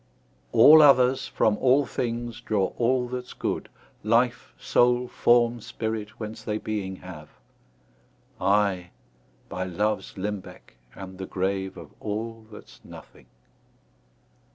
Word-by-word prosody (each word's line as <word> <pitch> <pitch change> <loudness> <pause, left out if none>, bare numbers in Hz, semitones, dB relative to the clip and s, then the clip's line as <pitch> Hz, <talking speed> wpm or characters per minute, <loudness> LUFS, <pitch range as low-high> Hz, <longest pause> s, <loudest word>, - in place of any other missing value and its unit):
All 145 +7 +8
others, 130 -3 +5
from 105 -1 +1
all 135 +4 +3
things, 120 -1 -4
draw 100 -3 -1
all 125 +1 +1
that's 125 0 -6
good, - - -3 0.3
Life, 115 +3 +1
soule, 125 0 +2
forme, 120 -1 +2
spirit, 110 -2 -5
whence 110 -1 -7
they 105 0 -3
beeing 105 -3 -4
have; 90 -5 -11 1.1
I, 100 -3 +1 0.6
by 95 - -4
loves 105 +4 -2
limbecke, 95 -9 -7 0.2
am 95 -1 -9
the 95 0 -6
grave 95 0 -2
Of - - -11
all, 110 +1 -5
that's 105 - -14
nothing. 65 - -14
110 Hz, 115 wpm, -25 LUFS, 95-120 Hz, 1.1 s, All